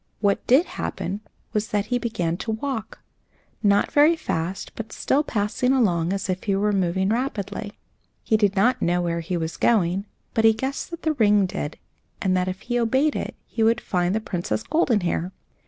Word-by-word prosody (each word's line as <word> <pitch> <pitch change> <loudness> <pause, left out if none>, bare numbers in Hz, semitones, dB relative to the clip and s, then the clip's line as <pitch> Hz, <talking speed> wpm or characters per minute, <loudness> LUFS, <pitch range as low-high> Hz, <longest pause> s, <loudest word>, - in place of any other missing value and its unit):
What 200 -2 +1
did 270 +8 +5
happen 200 - -4 0.3
was 215 0 0
that 205 -1 0
he 245 - +2
began 200 -9 -1
to 225 - -6
walk, 225 -1 -4 0.6
not 200 -1 +3
very 300 +3 +5
fast, 175 - -3
but 220 -1 -6
still 280 - +1
passing 230 +1 0
along 180 -9 +2
as 195 0 -2
if 185 -1 -3
he 200 -2 +1
were 205 +2 +1
moving 190 0 +1
rapidly. 220 -3 -2 0.5
He 220 - +2
did 205 -2 +2
not 245 +6 +3
know 175 +1 +2
where 170 -1 -1
he 175 +2 -2
was 160 -1 -3
going, 195 -2 +2 0.3
but 225 - +2
he 225 0 +7
guessed 265 +5 -3
that 335 -1 -8
the 315 - +2
ring 210 -6 +4
did, 180 -5 -4 0.4
and 185 -1 +1
that 180 0 +1
if 185 0 -4
he 245 0 -1
obeyed 265 +6 +2
it, - - -4
he 225 - -4
should 225 +1 +4
find 180 -2 0
the - - +2
Princess 185 0 -3
Goldenhair. 205 - +1
205 Hz, 190 wpm, -24 LUFS, 185-235 Hz, 0.6 s, he